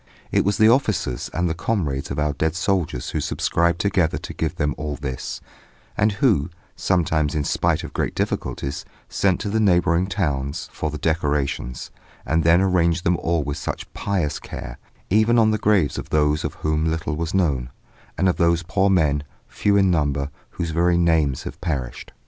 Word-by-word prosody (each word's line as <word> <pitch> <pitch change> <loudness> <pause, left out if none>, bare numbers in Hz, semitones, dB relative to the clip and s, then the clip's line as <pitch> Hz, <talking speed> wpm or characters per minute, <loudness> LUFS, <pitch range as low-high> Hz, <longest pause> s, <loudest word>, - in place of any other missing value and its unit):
It - - +3
was 100 +1 +1
the 110 0 +6
officers 110 - +1
and 90 +2 0
the 80 - 0
comrades 80 -7 -2
of - - -4
our 75 0 +1
dead 80 +3 -1
soldiers 90 -9 -1
who - - -1
subscribed 85 0 +1
together 90 -3 +1
to - - -7
give 80 +1 -2
them 75 -4 0
all 75 -1 -4
this, 65 -3 -5 0.5
and 105 0 +2
who, 100 - +2 0.3
sometimes 80 -5 +1
in 75 - 0
spite - - 0
of - - -8
great - - -2
difficulties, 70 +1 -3 0.3
sent 95 -2 +1
to 105 - -2
the 110 - +1
neighbouring 90 -3 +3
towns 75 -8 -2
for 80 - -2
the 75 - -5
decorations, 75 -5 -1 0.3
and 80 +1 +1
then 85 +3 +5
arranged 90 -2 +2
them 90 - +3
all 85 -2 0
with 70 0 -4
such - - -5
pious 90 -7 -1
care, - - -8 0.3
even 110 +3 +4
on 110 -1 +5
the 110 - 0
graves 100 -9 +2
of - - -8
those 75 0 +2
of - - -3
whom 75 0 0
little 80 -2 -2
was 85 +3 -3
known, 70 -10 +1 0.5
and 95 - +2
of 90 - +1
those 85 0 +2
poor 95 +3 +1
men, 75 -6 +2 0.3
few 100 -1 +1
in 95 -2 +4
number, 70 -3 0 0.2
whose 85 -1 -4
very 85 +2 +2
names 80 -6 +2
have - - -8
perished. 70 -8 -4
85 Hz, 185 wpm, -22 LUFS, 75-95 Hz, 0.5 s, the